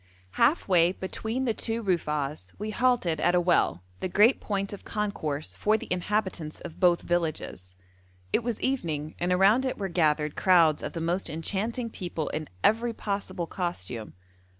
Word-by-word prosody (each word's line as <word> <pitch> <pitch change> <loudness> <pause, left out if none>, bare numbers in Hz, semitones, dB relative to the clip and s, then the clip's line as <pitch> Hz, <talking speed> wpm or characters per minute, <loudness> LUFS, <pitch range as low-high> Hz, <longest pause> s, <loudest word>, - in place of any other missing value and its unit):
Half 310 - +2
way 175 -2 +4
between 220 +7 -3
the 230 - +1
two 225 +1 -2
Rufa'as 150 - -1
we 215 +2 -4
halted 225 -10 +2
at 175 - +3
a - - +5
well, 170 - +2 0.2
the 185 - -2
great 210 +8 +4
point 200 -1 -2
of 200 - -9
concourse 160 -9 -3
for 215 +1 +2
the - - -8
inhabitants 180 -4 -2
of 170 -2 -9
both 175 -2 +4
villages. 155 - -2 0.6
It - - +3
was 235 -2 -3
evening, 160 - -1
and 175 +1 0
around 195 +7 +5
it 260 - -2
were 195 -1 -3
gathered 155 -3 +1
crowds 170 -5 +4
of - - -5
the 165 - -4
most 175 +3 -1
enchanting 215 +9 -2
people 170 -6 -4
in 155 -1 -4
every 230 +2 +3
possible 200 -4 -3
costume. 125 - -4
180 Hz, 165 wpm, -27 LUFS, 160-215 Hz, 0.6 s, a